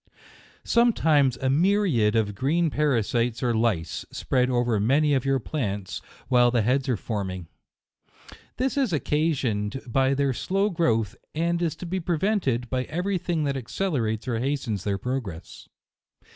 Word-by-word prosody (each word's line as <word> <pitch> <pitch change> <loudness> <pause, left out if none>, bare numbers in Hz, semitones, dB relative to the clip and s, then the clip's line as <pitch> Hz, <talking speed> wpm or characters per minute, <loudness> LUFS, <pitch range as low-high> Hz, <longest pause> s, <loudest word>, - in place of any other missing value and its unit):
Sometimes 155 - +3
a 130 - -2
myriad 160 - +2
of 105 -2 +1
green 155 - +1
parasites 120 -4 0
or 120 -1 +2
lice, 110 -8 0
spread 125 -1 0
over 120 -3 +1
many 145 +8 +3
of 135 -2 +1
your 135 0 +2
plants 105 -8 -4 0.3
while 120 -2 +5
the 120 -2 +1
heads 130 +4 +1
are 125 - +1
forming. 95 -5 -4 1.1
This 265 +3 -1
is 265 -7 +1
occasioned 135 -8 0
by 135 +2 +2
their 140 -1 +1
slow 195 +10 0
growth, 115 - +1 0.2
and 170 +2 0
is 165 -2 0
to 180 - -8
be 185 +2 -2
prevented 165 - 0
by 130 +1 -2
every 180 +4 -2
thing 170 -3 -1
that 140 -1 -1
accelerates 125 - -2
or 115 -3 -1
hastens 120 -7 -2
their 100 -1 0
progress. 110 -7 -6
130 Hz, 145 wpm, -25 LUFS, 115-160 Hz, 1.1 s, while